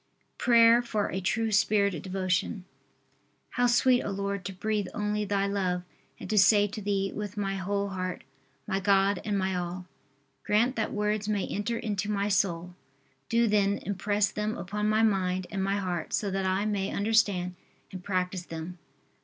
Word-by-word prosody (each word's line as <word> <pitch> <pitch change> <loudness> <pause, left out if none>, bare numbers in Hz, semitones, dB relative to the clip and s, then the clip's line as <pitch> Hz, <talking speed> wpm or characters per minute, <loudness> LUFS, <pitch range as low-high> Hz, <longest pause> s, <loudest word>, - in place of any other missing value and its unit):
PRAYER 235 0 +6
FOR 215 -4 -2
A 190 - -2
TRUE 225 +4 0
SPIRIT 200 -1 +3
OF 160 - -5
DEVOTION. 185 +1 -1 0.9
How 245 0 +2
sweet, 245 +1 +4
O - - -4
Lord, 200 0 -3
to 195 - -3
breathe 205 +1 -2
only 210 -1 -1
Thy 200 0 0
love 185 -3 -1 0.4
and - - -7
to 210 -1 +3
say 205 +1 +6
to 210 +2 -6
Thee 195 -1 -1
with 210 +1 -5
my 195 -1 -1
whole 200 +1 -1
heart: 185 -1 -4 0.4
My 195 -2 -1
God 195 0 +2
and 205 -2 -1
my 190 0 0
all! 180 +1 -4 0.6
Grant 235 +5 +2
that 220 - -1
words 210 0 -1
may 205 -3 0
enter 230 +3 -2
into 210 -3 -2
my 205 0 0
soul! 180 -3 0 0.6
do 235 0 +3
then, 205 -2 +2
impress 205 +1 0
them 210 +1 -2
upon 210 +4 -2
my 215 +1 +3
mind 185 -3 +1
and 195 -1 -2
my 195 +1 0
heart 180 -4 -3
so 205 -3 0
that 190 0 -1
I 190 +2 0
may 200 -2 -1
understand 200 -4 +1 0.4
and 185 -1 -8
practice 185 -1 -2
them. 165 +2 -7
200 Hz, 175 wpm, -28 LUFS, 190-210 Hz, 0.9 s, PRAYER